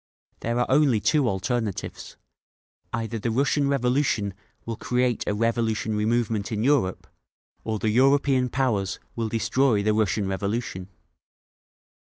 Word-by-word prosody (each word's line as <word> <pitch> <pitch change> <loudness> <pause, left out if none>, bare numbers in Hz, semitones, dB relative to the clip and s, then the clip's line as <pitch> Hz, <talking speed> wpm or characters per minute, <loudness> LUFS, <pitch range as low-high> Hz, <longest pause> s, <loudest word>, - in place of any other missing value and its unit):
"There 115 +1 -2
are 120 - +2
only 135 -5 +3
two 140 +3 +2
alternatives; 105 +1 -3 0.7
either 115 0 -3
the 115 - -2
Russian 140 +4 +1
Revolution 125 -6 +1 0.3
will 115 - -3
create 125 +1 0
a 105 - 0
revolutionary 110 -1 0
movement 115 -2 0
in 110 0 -1
Europe, 130 -9 +1 0.6
or 110 -1 -2
the 110 +1 0
European 135 +1 +3
powers 115 -7 0 0.2
will 115 -1 -2
destroy 115 0 +1
the 105 +1 +2
Russian 105 -1 +1
Revolution!" 100 -1 -3
115 Hz, 125 wpm, -25 LUFS, 105-125 Hz, 0.7 s, only